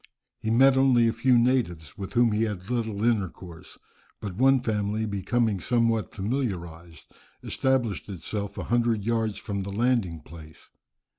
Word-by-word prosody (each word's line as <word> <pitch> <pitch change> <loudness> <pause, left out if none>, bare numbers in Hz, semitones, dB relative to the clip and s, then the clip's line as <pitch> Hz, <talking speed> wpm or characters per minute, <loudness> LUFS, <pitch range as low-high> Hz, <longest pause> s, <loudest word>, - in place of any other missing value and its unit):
He 110 - -3
met 130 +4 +5
only 130 -3 +4
a 115 - +1
few 125 +2 +3
natives, 115 - 0
with 100 -3 -7
whom 120 -2 +4
he 105 +1 0
had 105 0 -5
little 110 -4 -2
intercourse. 95 -6 -3 0.4
But 100 -3 -5
one 135 +3 +4
family 110 -2 -1
becoming 105 +1 0
somewhat 115 +1 +1
familiarized, 90 - -4 0.3
established 120 - -1
itself 100 +2 -5
a - - -3
hundred 115 -3 +1
yards 115 -2 0
from 100 -1 -4
the 100 +1 -5
landing 105 -7 0
place. 80 -2 -14
110 Hz, 145 wpm, -26 LUFS, 95-120 Hz, 0.4 s, met